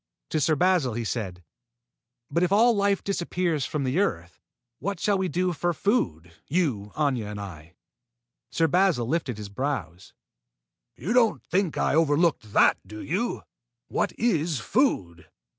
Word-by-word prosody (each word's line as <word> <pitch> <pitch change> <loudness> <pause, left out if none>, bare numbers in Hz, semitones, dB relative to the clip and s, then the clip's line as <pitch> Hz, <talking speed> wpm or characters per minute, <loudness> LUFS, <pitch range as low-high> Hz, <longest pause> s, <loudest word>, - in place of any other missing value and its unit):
To 155 - 0
Sir 155 +2 +2
Basil 165 -7 +2
he 120 - -2
said: 95 -6 -4 0.9
"But 170 - +1
if 180 0 +2
all 230 +3 +5
life 200 -1 +1
disappears 175 -5 -1
from 150 -2 -2
the 130 +6 0
earth, 90 - -2 0.4
what 200 +1 -3
shall 205 - +2
we 190 -1 0
do 180 0 0
for 175 +2 -1
food 90 - -1
you, 135 - -1
Aña, 130 -8 0
and 105 -1 -6
I?" 85 -4 -9 0.7
Sir 165 - +2
Basil 180 -7 +2
lifted 140 -5 -1
his 105 -1 -7
brows. 100 - -4 0.8
"You 180 - -3
don't 235 -3 +3
think 185 -3 0
I - - +1
overlooked 150 - +2
that, - - +4
do 110 +3 -10
you? 185 - -2 0.5
What - - 0
is 165 - +1
food? 105 - 0
155 Hz, 150 wpm, -26 LUFS, -, 0.9 s, all